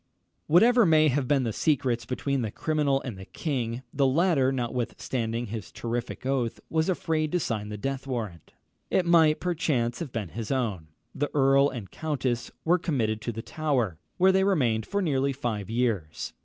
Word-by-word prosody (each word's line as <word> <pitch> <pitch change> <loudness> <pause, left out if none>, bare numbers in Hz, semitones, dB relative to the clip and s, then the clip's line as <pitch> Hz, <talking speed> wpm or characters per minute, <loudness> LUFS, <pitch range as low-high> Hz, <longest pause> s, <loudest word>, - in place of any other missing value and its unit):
] - - -49
Whatever 235 +9 +6
may 155 -4 +5
have 135 -1 0
been 140 -1 +3
the 115 -3 -2
secrets 125 -6 0
between 135 +2 -1
the 110 - -2
criminal 145 +2 0
and 115 -7 -6
the 95 - -8
king, 125 - -3
the 135 -1 +3
latter, 140 -2 +3
notwithstanding 120 -1 -2
his 105 -4 -6
terrific 120 +2 -4
oath, 130 -4 -1
was 160 +2 +1
afraid 160 -4 0
to 180 - +1
sign 105 -8 -3
the 105 - -5
death 135 +4 -4
warrant. 110 - -5 0.4
It 185 - +2
might, 160 -3 +5
perchance, 150 -9 0
have 160 -6 -5
been 105 -7 -4
his 115 +2 -6
own. 110 -12 -1 0.3
The 145 - -1
earl 140 0 +5
and 110 -8 -7
countess 135 -6 -2 0.2
were 175 +2 +4
committed 115 -10 -1
to 120 - -3
the 115 0 -6
Tower, 130 - -1 0.2
where 190 +1 +5
they 190 0 +3
remained 125 - +1
for 200 0 -1
nearly 140 -4 +1
five 115 -7 -3
years. 110 -10 -1
130 Hz, 180 wpm, -27 LUFS, 115-155 Hz, 0.4 s, Whatever